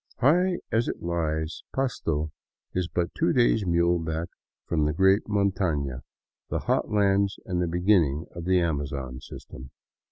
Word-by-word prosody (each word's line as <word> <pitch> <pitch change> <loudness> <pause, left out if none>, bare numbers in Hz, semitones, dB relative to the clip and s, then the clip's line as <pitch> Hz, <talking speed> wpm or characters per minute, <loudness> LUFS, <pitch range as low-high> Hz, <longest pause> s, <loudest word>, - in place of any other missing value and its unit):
High 175 +7 +3
as 115 +1 +2
it - - -4
lies, 80 -2 -2
Pasto 80 - -1 0.4
is 90 -2 0
but 85 0 -2
two 165 - +1
days 115 -5 +3
muleback 85 -1 +1 0.4
from 80 -3 +1
the 75 - +1
great 95 +4 +3
montana, 90 -10 0 0.5
the - - -1
hot - - 0
lands 100 -1 +2
and 90 -2 -1
the 90 - +1
beginning 85 -4 +2
of 85 -1 -7
the 95 0 +3
Amazon 70 -5 -2
system. 65 0 -10
85 Hz, 140 wpm, -26 LUFS, 80-100 Hz, 0.5 s, High